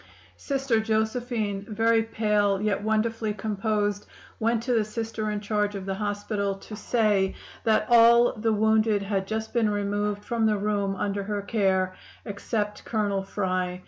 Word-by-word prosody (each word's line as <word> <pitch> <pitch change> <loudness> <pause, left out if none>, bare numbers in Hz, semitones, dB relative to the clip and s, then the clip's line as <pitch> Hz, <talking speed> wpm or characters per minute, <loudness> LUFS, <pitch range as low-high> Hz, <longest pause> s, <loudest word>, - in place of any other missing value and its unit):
"Sister 270 -5 0
Josephine, 220 -2 -1
very 225 +1 +3
pale, 210 -3 +1
yet 210 0 0
wonderfully 220 0 0
composed, 205 0 -1 0.3
went 230 0 +1
to 250 0 0
the 225 -2 +3
Sister 220 0 -4
in 210 -1 -2
charge 210 0 -1
of 195 -1 -5
the 195 - -2
hospital 205 0 -2
to 210 +2 -10
say 210 -3 +1 0.3
that 220 -1 +3
all 235 0 +6
the 225 +1 0
wounded 220 -1 +2
had 195 -1 -2
just 220 +1 -3
been 230 -3 +2
removed 205 0 -1
from 230 -3 +1
the 210 -1 +2
room 200 -1 -1
under 200 +1 -2
her 205 -1 -3
care 190 -3 +1 0.3
except 210 0 -3
Colonel 205 -3 -1
Fry. 185 -2 -2
210 Hz, 150 wpm, -26 LUFS, 200-220 Hz, 0.3 s, all